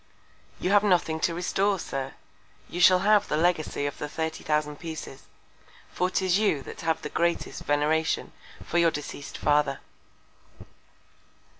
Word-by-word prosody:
You 180 Hz, -, -1 dB
have 205 Hz, 0 st, +5 dB
nothing 175 Hz, -5 st, +2 dB
to 165 Hz, +1 st, 0 dB
restore, 195 Hz, +3 st, +1 dB
Sir; 135 Hz, -5 st, -4 dB, 0.5 s
you 175 Hz, -, -4 dB
shall 180 Hz, 0 st, +7 dB
have 210 Hz, -1 st, +4 dB
the 150 Hz, -, 0 dB
Legacy 160 Hz, -3 st, +1 dB
of 145 Hz, -, -4 dB
the 150 Hz, -, -4 dB
thirty 160 Hz, +1 st, -4 dB
thousand 150 Hz, -1 st, 0 dB
Pieces; 160 Hz, -5 st, -8 dB, 0.6 s
for 180 Hz, -, 0 dB
'tis 185 Hz, 0 st, +1 dB
you 180 Hz, -10 st, +1 dB
that -, -, -9 dB
have 160 Hz, 0 st, -1 dB
the 150 Hz, -, -4 dB
greatest 170 Hz, +2 st, -1 dB
Veneration 150 Hz, +2 st, +1 dB, 0.3 s
for 175 Hz, -, 0 dB
your 170 Hz, -1 st, +5 dB
deceased 145 Hz, -2 st, -7 dB
Father. 145 Hz, -2 st, +2 dB
160 Hz, 145 wpm, -27 LUFS, 150-180 Hz, 0.6 s, shall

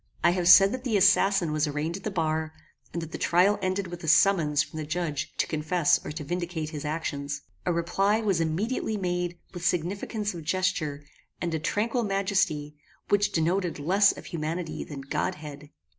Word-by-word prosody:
I 170 Hz, -, +6 dB
have 175 Hz, -1 st, 0 dB
said 195 Hz, +2 st, +9 dB
that 255 Hz, +1 st, -4 dB
the 230 Hz, -5 st, +1 dB
assassin 195 Hz, -3 st, +4 dB
was 155 Hz, 0 st, +1 dB
arraigned 150 Hz, +3 st, -2 dB
at 195 Hz, -, -8 dB
the -, -, -2 dB
bar, 160 Hz, -4 st, -1 dB, 0.4 s
and 170 Hz, -, -4 dB
that 165 Hz, -, -8 dB
the -, -, -6 dB
trial 185 Hz, +5 st, +3 dB
ended 190 Hz, +1 st, -1 dB
with 175 Hz, -1 st, -8 dB
a -, -, -5 dB
summons 160 Hz, -3 st, +4 dB
from -, -, -10 dB
the -, -, -3 dB
judge 155 Hz, -3 st, -2 dB
to -, -, +2 dB
confess 155 Hz, +1 st, +1 dB
or -, -, -5 dB
to 155 Hz, 0 st, -6 dB
vindicate 170 Hz, -1 st, -3 dB
his 150 Hz, -2 st, -6 dB
actions. 145 Hz, -2 st, -3 dB, 0.3 s
A -, -, +3 dB
reply 195 Hz, +5 st, +1 dB
was 195 Hz, -6 st, +1 dB
immediately 210 Hz, +7 st, -1 dB
made 180 Hz, -2 st, -2 dB, 0.2 s
with 175 Hz, -2 st, -7 dB
significance 200 Hz, +5 st, -1 dB
of 170 Hz, -2 st, -7 dB
gesture, 155 Hz, -4 st, -1 dB, 0.4 s
and 170 Hz, -2 st, -2 dB
a 160 Hz, -, 0 dB
tranquil 225 Hz, +9 st, 0 dB
majesty, 190 Hz, -7 st, 0 dB, 0.3 s
which 205 Hz, 0 st, +3 dB
denoted 175 Hz, +2 st, 0 dB
less 190 Hz, +7 st, +4 dB
of -, -, -10 dB
humanity 165 Hz, 0 st, -4 dB
than 145 Hz, -3 st, -8 dB
godhead. 145 Hz, +1 st, -4 dB
175 Hz, 185 wpm, -27 LUFS, 155-195 Hz, 0.4 s, said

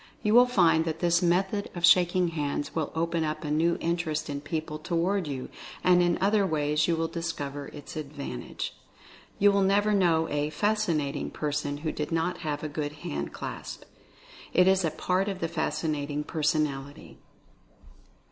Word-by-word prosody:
You 210 Hz, -, +2 dB
will 245 Hz, +1 st, +7 dB
find 170 Hz, -9 st, +4 dB
that 160 Hz, -1 st, -2 dB
this 175 Hz, 0 st, +2 dB
method 190 Hz, +4 st, +1 dB
of 175 Hz, -1 st, +3 dB
shaking 175 Hz, 0 st, +4 dB
hands 145 Hz, -2 st, -3 dB
will 160 Hz, -2 st, -2 dB
open 165 Hz, 0 st, 0 dB
up 155 Hz, 0 st, -3 dB
a 150 Hz, -, -3 dB
new 165 Hz, +3 st, +2 dB
interest 165 Hz, -3 st, -1 dB
in 140 Hz, 0 st, -4 dB
people 155 Hz, 0 st, -4 dB
toward 175 Hz, +3 st, 0 dB
you, 135 Hz, -3 st, -4 dB, 0.4 s
and 180 Hz, -1 st, +5 dB
in 175 Hz, -1 st, +2 dB
other 205 Hz, +2 st, +3 dB
ways 150 Hz, -3 st, +1 dB
you 170 Hz, -, +2 dB
will 165 Hz, 0 st, 0 dB
discover 145 Hz, -5 st, -4 dB
its 145 Hz, -, -10 dB
advantage. 140 Hz, -, -5 dB, 0.6 s
You 205 Hz, +1 st, +5 dB
never 205 Hz, +2 st, +3 dB
knew 170 Hz, -5 st, +3 dB
a 145 Hz, 0 st, 0 dB
"fascinating" 165 Hz, -5 st, 0 dB
person 145 Hz, -1 st, -2 dB
who 155 Hz, -, +1 dB
did 150 Hz, +1 st, -4 dB
not 165 Hz, +2 st, 0 dB
have 150 Hz, -1 st, -3 dB
a -, -, -1 dB
good 150 Hz, 0 st, -4 dB
hand 70 Hz, 0 st, -3 dB
clasp. -, -, -7 dB, 0.7 s
It 180 Hz, +1 st, +5 dB
is 190 Hz, 0 st, +4 dB
a 165 Hz, -, +2 dB
part 180 Hz, +5 st, 0 dB
of 195 Hz, -, -3 dB
the 165 Hz, -, -1 dB
fascinating 150 Hz, -2 st, -2 dB
per 155 Hz, +1 st, -5 dB
sonality. 145 Hz, -3 st, -1 dB
160 Hz, 165 wpm, -28 LUFS, 150-180 Hz, 0.7 s, will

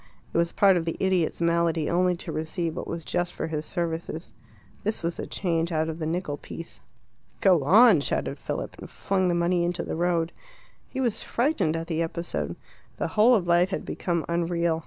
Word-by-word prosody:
It -, -, 0 dB
was 170 Hz, 0 st, +1 dB
part 195 Hz, -2 st, +5 dB
of 165 Hz, -, -1 dB
the 165 Hz, -, -2 dB
idiot's 185 Hz, -4 st, +1 dB
malady 170 Hz, -2 st, +2 dB
only 180 Hz, +1 st, +2 dB
to -, -, -7 dB
receive 160 Hz, +1 st, -2 dB
what -, -, -5 dB
was 165 Hz, -2 st, -5 dB
just 175 Hz, 0 st, -1 dB
for -, -, -2 dB
his 155 Hz, -1 st, -3 dB
services. 165 Hz, -1 st, -4 dB, 0.5 s
This 215 Hz, -3 st, -2 dB
was 170 Hz, 0 st, -2 dB
the -, -, -5 dB
change 170 Hz, -2 st, -1 dB
out 160 Hz, 0 st, 0 dB
of 160 Hz, +1 st, -5 dB
the 155 Hz, -, -2 dB
nickel 160 Hz, -3 st, -2 dB
piece. 165 Hz, +3 st, -9 dB, 0.6 s
"Go 180 Hz, -7 st, +4 dB
on!" 205 Hz, -, +7 dB
shouted -, -, -2 dB
Philip, -, -, -4 dB
and -, -, -9 dB
flung 190 Hz, -1 st, 0 dB
the 175 Hz, -, +2 dB
money 170 Hz, 0 st, +2 dB
into 175 Hz, 0 st, -1 dB
the -, -, -4 dB
road. 170 Hz, 0 st, +1 dB, 0.6 s
He -, -, -5 dB
was 240 Hz, -5 st, 0 dB
frightened 240 Hz, -, +1 dB
at 165 Hz, 0 st, -3 dB
the 165 Hz, -1 st, -1 dB
episode; 170 Hz, +1 st, -3 dB, 0.4 s
the -, -, -1 dB
whole 220 Hz, +3 st, +5 dB
of 185 Hz, -5 st, 0 dB
life 175 Hz, +2 st, +4 dB
had 190 Hz, -, -3 dB
become 170 Hz, -3 st, -2 dB
unreal. 170 Hz, -1 st, 0 dB
170 Hz, 200 wpm, -26 LUFS, 165-180 Hz, 0.6 s, on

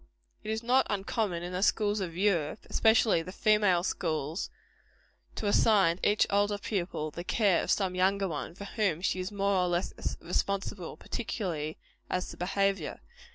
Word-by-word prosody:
It -, -, -6 dB
is 220 Hz, +1 st, -2 dB
not 255 Hz, +3 st, +3 dB
uncommon 195 Hz, -3 st, -1 dB
in 175 Hz, +1 st, -5 dB
the 180 Hz, -, -2 dB
schools 210 Hz, 0 st, +2 dB
of 175 Hz, -3 st, -4 dB
Europe, 180 Hz, -3 st, 0 dB
especially 220 Hz, -5 st, +4 dB
the 180 Hz, -, -8 dB
female 205 Hz, -3 st, +3 dB
schools, 160 Hz, -3 st, -2 dB, 0.9 s
to -, -, -4 dB
assign 205 Hz, -4 st, +4 dB
to -, -, +2 dB
each 210 Hz, -, +3 dB
older 205 Hz, +1 st, +2 dB
pupil 175 Hz, -7 st, -3 dB
the 170 Hz, -, -6 dB
care 195 Hz, -1 st, +2 dB
of -, -, -5 dB
some 190 Hz, -3 st, +1 dB
younger 195 Hz, +2 st, +2 dB
one, 165 Hz, 0 st, -5 dB
for 200 Hz, -, -8 dB
whom 195 Hz, -6 st, -1 dB
she 185 Hz, -, 0 dB
is 185 Hz, +2 st, -3 dB
more 200 Hz, 0 st, 0 dB
or 180 Hz, -1 st, +2 dB
less 175 Hz, +1 st, -1 dB, 0.3 s
responsible, 200 Hz, -2 st, -2 dB
particularly 170 Hz, -9 st, -4 dB, 0.3 s
as 180 Hz, 0 st, -2 dB
to -, -, -9 dB
behaviour. 195 Hz, +2 st, 0 dB
195 Hz, 165 wpm, -30 LUFS, 175-205 Hz, 0.9 s, especially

